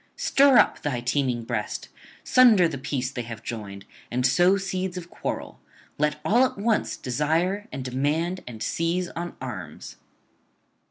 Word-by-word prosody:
Stir 275 -2 +5
up - - +4
thy 140 -5 -2
teeming 125 -1 0
breast, 115 -2 -4 0.3
sunder 225 -9 +6
the 145 -5 -5
peace 130 -1 -2
they 125 - -4
have 115 -2 -8
joined, 100 -4 -7 0.2
and 125 +1 0
sow 175 +8 +4
seeds 190 -1 -3
of 175 -1 -8
quarrel; - - -5 0.4
let 150 0 +1
all 230 +9 +4
at 260 - 0
once 215 +2 0
desire 165 - 0
and 130 - -5
demand 150 +8 -1
and 115 -3 -6
seize 170 +2 -1
on 170 +1 -6
arms.' 95 -12 -7
150 Hz, 150 wpm, -25 LUFS, 125-185 Hz, 0.4 s, sunder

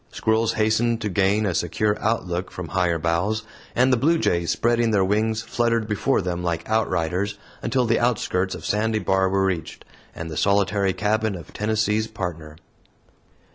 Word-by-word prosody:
Squirrels 110 0 +1
hastened 110 +2 +1
to 105 - -1
gain 100 +3 +2
a 95 - 0
secure 105 +6 0
outlook 95 -5 -1
from 90 -3 -7
higher 90 0 +1
boughs; 85 +7 0 0.3
and 130 +1 +4
the - - +4
bluejays, 125 - +1
spreading 120 0 +2
their 100 -3 +3
wings, 110 +2 0
fluttered 115 -1 0
before 105 +2 +1
them 90 -1 -3
like 85 -1 -2
outriders, 100 -2 0 0.2
until 130 -2 +1
the 115 0 +2
outskirts 100 -6 0
of - - -9
Sandy 110 +1 +1
Bar 95 -2 +1
were 95 0 +1
reached, 90 -5 -3 0.3
and 80 0 -6
the 75 - -5
solitary 100 0 +2
cabin 110 0 0
of 85 -3 -11
Tennessee's 110 0 0
Partner. 80 -8 -6
105 Hz, 160 wpm, -23 LUFS, 90-110 Hz, 0.3 s, and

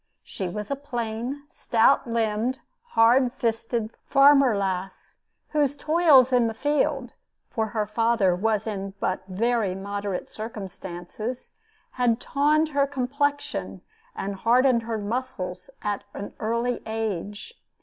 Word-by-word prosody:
She 190 -2 -5
was 210 +5 -5
a - - +1
plain, 245 0 -4
stout 235 +3 +3
limbed, 230 +2 0 0.4
hard 240 +3 +5
fisted 230 -2 -1 0.2
farmer 275 -4 +6
lass, 190 -1 -3 0.4
whose 290 -2 +1
toils 300 -5 +5
in 245 -2 +4
the 225 - -4
field 290 +5 0 0.4
for 220 -1 -1
her 215 -1 -1
father 215 -3 +2
was 215 +2 0
in 195 -2 -4
but 185 - -1
very 215 0 0
moderate 200 -1 -4
circumstances 210 +1 -7 0.4
had 245 -2 +1
tawned 300 +4 +2
her 280 -1 +2
complexion 285 +2 -2 0.3
and 195 0 -4
hardened 245 +3 +4
her 225 0 -3
muscles, 205 -3 -4
at 205 -1 -2
an 200 - -6
early 235 +2 -1
age. 215 - -4
230 Hz, 120 wpm, -25 LUFS, 205-260 Hz, 0.4 s, farmer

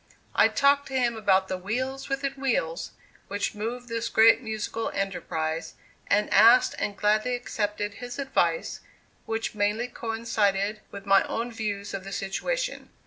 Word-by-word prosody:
I - - +6
talked 280 0 +3
to 270 - -6
him 240 -2 +1
about 190 -3 +2
the 185 -1 -3
"wheels 260 +8 -3
within 275 0 -1
wheels" 240 -12 -1 0.4
which 200 +3 -2
moved 235 +4 -5
this 230 0 -2
great 225 +2 +6
musical 220 0 -3
enterprise, 165 -4 -3 0.3
and 210 +1 +2
asked 230 +5 +7
and 200 -1 -2
gladly 215 +5 +2
accepted 210 -3 -3
his 245 0 -6
advice, 280 - 0 0.5
which 225 0 -2
mainly 210 +3 0
coincided 215 -3 -1
with 200 0 -9
my 195 -1 +6
own 235 +2 -3
views 205 -3 -4
of 195 -1 -4
the 195 - -8
situation. - - -3
220 Hz, 145 wpm, -26 LUFS, 200-245 Hz, 0.5 s, asked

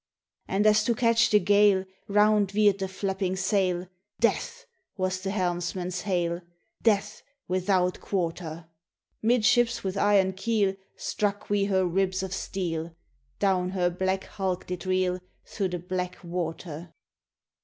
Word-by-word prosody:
"And 200 +2 +1
as 215 0 +5
to 235 - +2
catch 230 -1 +3
the 210 - +6
gale 205 -2 +4 0.2
Round 210 -1 +4
veered 205 -1 +3
the 190 - -1
flapping 190 0 -2
sail, 185 -2 0 0.2
' 210 - -60
Death! 480 +1 -6 0.2
' 380 - -50
was 185 -1 -1
the 190 - -3
helmsman's 180 -1 -2
hail, 175 -3 -1 0.4
'Death 210 -1 +1 0.3
without 185 0 +1
quarter!' 165 -3 -3 0.5
Mid 230 0 +3
ships 240 +1 +3
with 190 0 -2
iron 195 -2 +4
keel 205 0 +1 0.2
Struck 205 -1 -2
we 205 -1 +2
her 190 -2 +2
ribs 185 +1 0
of 190 -1 -4
steel; 170 -4 -3 0.4
Down 185 -2 +1
her 180 -2 +1
black 190 +2 -1
hulk 185 -2 -3
did 180 +1 -5
reel 185 -1 +1 0.3
Through 200 -3 -2
the 180 -1 -3
black 180 +1 -4
water! 170 -1 -5
190 Hz, 145 wpm, -27 LUFS, 180-205 Hz, 0.5 s, the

